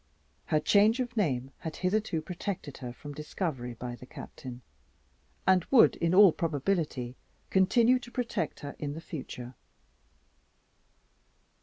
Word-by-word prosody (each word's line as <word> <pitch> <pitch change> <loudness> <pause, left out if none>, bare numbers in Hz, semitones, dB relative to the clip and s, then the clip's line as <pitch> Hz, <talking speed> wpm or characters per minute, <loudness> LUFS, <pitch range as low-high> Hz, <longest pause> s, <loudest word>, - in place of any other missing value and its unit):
Her 155 - +3
change 210 - +4
of 245 -1 -2
name 135 - 0
had 160 -1 -5
hitherto 185 -4 0
protected 180 -3 -5
her 125 -2 -6
from 145 +4 -9
discovery 145 -5 -4
by 120 +1 -5
the 125 - -13
Captain, 125 -1 -9 0.8
and 185 -2 +5
would 260 -4 +6
in 170 +1 +1
all 200 -2 +9
probability 150 -5 -1 0.4
continue 230 +6 +4
to 240 - -11
protect 240 -9 -2
her 145 0 -6
in 145 -1 -3
the - - -5
future. 130 -6 -7
160 Hz, 130 wpm, -30 LUFS, 130-200 Hz, 0.8 s, all